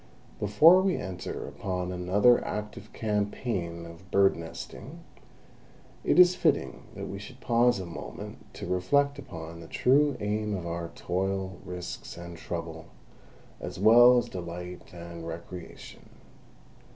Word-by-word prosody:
Before 155 Hz, -, +7 dB
we 190 Hz, -2 st, +1 dB
enter 95 Hz, -3 st, -5 dB
upon 90 Hz, -1 st, -3 dB
another 95 Hz, +7 st, +4 dB
active 105 Hz, 0 st, -5 dB
campaign 100 Hz, -5 st, -2 dB
of 85 Hz, +3 st, -13 dB
bird 100 Hz, 0 st, +4 dB
nesting, 85 Hz, -1 st, -8 dB, 1.0 s
it -, -, +2 dB
is 180 Hz, 0 st, +8 dB
fitting 145 Hz, -, 0 dB
that -, -, -5 dB
we 100 Hz, -, -6 dB
should 125 Hz, +5 st, -11 dB
pause 120 Hz, -2 st, +3 dB
a 95 Hz, -, -5 dB
moment 70 Hz, -8 st, -9 dB
to -, -, -6 dB
reflect 140 Hz, +10 st, +1 dB
upon 85 Hz, -9 st, -8 dB
the 85 Hz, -, -10 dB
true 140 Hz, +1 st, +3 dB
aim 105 Hz, 0 st, -1 dB
of 90 Hz, -3 st, -5 dB
our 85 Hz, 0 st, -4 dB
toil, 95 Hz, 0 st, -2 dB
risks, 90 Hz, -2 st, -7 dB
and 85 Hz, 0 st, -8 dB
trouble, 85 Hz, -1 st, -6 dB, 0.7 s
as -, -, -6 dB
well 120 Hz, +5 st, +8 dB
as 120 Hz, -, +1 dB
delight 90 Hz, 0 st, -7 dB
and 85 Hz, -1 st, -8 dB
recreation. 85 Hz, +1 st, -9 dB
95 Hz, 130 wpm, -28 LUFS, 85-115 Hz, 1.0 s, is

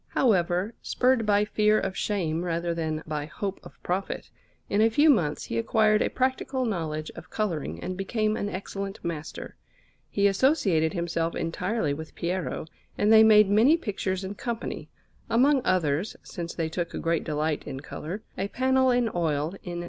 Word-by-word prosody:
However, 185 Hz, -2 st, +1 dB
spurred 250 Hz, -3 st, +1 dB
by 205 Hz, 0 st, +4 dB
fear 210 Hz, 0 st, +3 dB
of 190 Hz, -1 st, -3 dB
shame 170 Hz, -5 st, -1 dB
rather 170 Hz, 0 st, -1 dB
than 160 Hz, -1 st, -2 dB
by 150 Hz, -1 st, -3 dB
hope 190 Hz, +7 st, -4 dB
of -, -, -13 dB
profit, 185 Hz, +2 st, -3 dB, 0.4 s
in 205 Hz, -, +1 dB
a 225 Hz, -, +5 dB
few 295 Hz, +7 st, +5 dB
months 160 Hz, -, +1 dB
he 115 Hz, -, -2 dB
acquired 215 Hz, -, +3 dB
a -, -, +2 dB
practical 260 Hz, 0 st, -1 dB
knowledge 160 Hz, -7 st, -3 dB
of -, -, -12 dB
colouring 160 Hz, -, -2 dB
and 185 Hz, -, -4 dB
became 215 Hz, +3 st, 0 dB
an 205 Hz, -, -2 dB
excellent 195 Hz, +1 st, -5 dB
master. 160 Hz, -2 st, -5 dB, 0.5 s
He 200 Hz, -, +1 dB
associated 195 Hz, -, +3 dB
himself 170 Hz, -2 st, -1 dB
entirely 180 Hz, -1 st, -1 dB
with 160 Hz, +2 st, -8 dB
Piero, 180 Hz, -1 st, -2 dB, 0.3 s
and 210 Hz, +2 st, +4 dB
they 220 Hz, -, +9 dB
made 215 Hz, -2 st, +7 dB
many 225 Hz, +11 st, +5 dB
pictures 195 Hz, -, -3 dB
in 190 Hz, +1 st, -4 dB
company; 235 Hz, +2 st, -5 dB, 0.4 s
among 265 Hz, +4 st, +4 dB
others, 170 Hz, 0 st, +1 dB
since 170 Hz, -3 st, -6 dB
they 165 Hz, -2 st, -1 dB
took 170 Hz, +1 st, -3 dB
great 165 Hz, -1 st, 0 dB
delight 155 Hz, 0 st, -1 dB
in 135 Hz, 0 st, -5 dB
colour, 175 Hz, +8 st, -6 dB, 0.2 s
a 195 Hz, -, 0 dB
panel 260 Hz, +3 st, +2 dB
in 245 Hz, -1 st, +3 dB
oil 160 Hz, -1 st, 0 dB
in 175 Hz, -1 st, -6 dB
S. -, -, -3 dB
190 Hz, 170 wpm, -27 LUFS, 165-220 Hz, 0.5 s, they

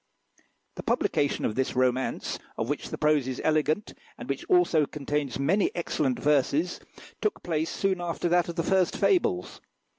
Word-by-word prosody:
The -, -, -4 dB
publication 145 Hz, -1 st, 0 dB
of -, -, 0 dB
this 130 Hz, +3 st, -1 dB
romance, 130 Hz, 0 st, 0 dB, 0.2 s
of 115 Hz, -, -2 dB
which 145 Hz, -, -3 dB
the -, -, -5 dB
prose 150 Hz, -3 st, +2 dB
is 130 Hz, -1 st, -4 dB
elegant, 155 Hz, +5 st, +1 dB, 0.2 s
and -, -, -8 dB
which -, -, -3 dB
also 355 Hz, -, +3 dB
contains 145 Hz, -3 st, -2 dB
many 170 Hz, +9 st, +2 dB
excellent 145 Hz, -6 st, -1 dB
verses, 150 Hz, +4 st, +1 dB, 0.4 s
took 425 Hz, -, -1 dB
place 160 Hz, -1 st, -1 dB
soon 190 Hz, -2 st, -1 dB
after 175 Hz, 0 st, -2 dB
that 175 Hz, 0 st, +2 dB
of 170 Hz, -, -5 dB
the 165 Hz, -, 0 dB
first 185 Hz, 0 st, +2 dB
fables. 180 Hz, -, +1 dB
155 Hz, 160 wpm, -27 LUFS, 140-175 Hz, 0.4 s, also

